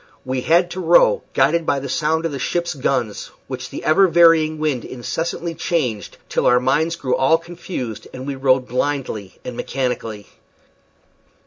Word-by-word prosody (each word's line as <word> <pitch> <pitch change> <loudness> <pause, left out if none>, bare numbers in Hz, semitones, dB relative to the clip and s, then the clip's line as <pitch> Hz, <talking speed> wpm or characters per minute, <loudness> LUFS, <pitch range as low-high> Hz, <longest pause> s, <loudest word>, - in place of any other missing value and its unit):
We 130 0 -2
had 175 +5 +3
to 185 - -5
row, - - +4
guided 170 0 +3
by 140 - +1
the 140 - -6
sound 160 +4 0
of 165 - -1
the 140 - -5
ship's 170 +5 -1
gun, 130 -6 -1 0.3
which - - -6
the - - -7
ever 175 +5 +5
varying 165 -2 +5
wind 150 -6 -1
incessantly 165 +6 -4
changed, 125 -12 -2
till - - 0
our 125 - +5
minds 150 +6 +1
grew 130 -6 -1
all 150 +5 +4
confused, 165 - -7
and 130 0 -8
we 140 - -3
rowed 130 -1 +2
blindly 125 -7 -3
and 125 - -5
mechanically. 120 -6 -3
145 Hz, 160 wpm, -20 LUFS, 125-165 Hz, 0.3 s, ever